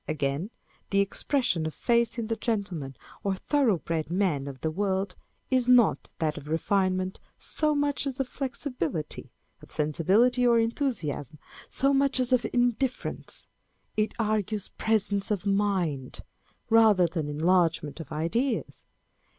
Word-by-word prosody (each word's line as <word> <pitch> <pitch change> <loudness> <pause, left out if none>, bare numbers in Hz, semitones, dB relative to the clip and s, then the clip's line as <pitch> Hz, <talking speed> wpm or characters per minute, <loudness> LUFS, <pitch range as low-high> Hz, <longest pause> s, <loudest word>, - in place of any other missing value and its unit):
Again, 150 +4 -1 0.4
the 195 - +2
expression 200 - 0
of 155 - -6
face 235 0 +1
in 230 - -2
the 225 +1 -1
gentleman 185 - -3 0.3
or 195 -1 0
thorough 250 -1 +2
bred 160 -1 -3
man 170 -7 0
of 135 -2 -8
the 160 - -1
world 190 +1 -1 0.4
is 255 -1 +2
not 245 -4 +4
that 155 -1 -1
of 145 - -13
refinement 185 +3 0 0.2
so 305 -1 0
much 285 0 0
as 270 0 -4
of 270 - 0
flexibility; 250 - -4 0.3
of - - -15
sensibility 190 - +2
or 235 -1 +5
enthusiasm, 225 - -1 0.3
so 275 +1 +2
much 275 -1 +2
as 255 0 +1
of 245 -2 +3
indifference: 245 +1 -1 0.5
it 215 0 0
argues 215 -2 -1
presence 205 -2 +1
of 205 -2 -1
mind, 190 -10 0 0.5
rather 220 -5 +6
than 160 -3 -2
enlargement 165 -1 +1
of 160 - -8
ideas. 220 - -1
200 Hz, 135 wpm, -27 LUFS, 160-240 Hz, 0.5 s, rather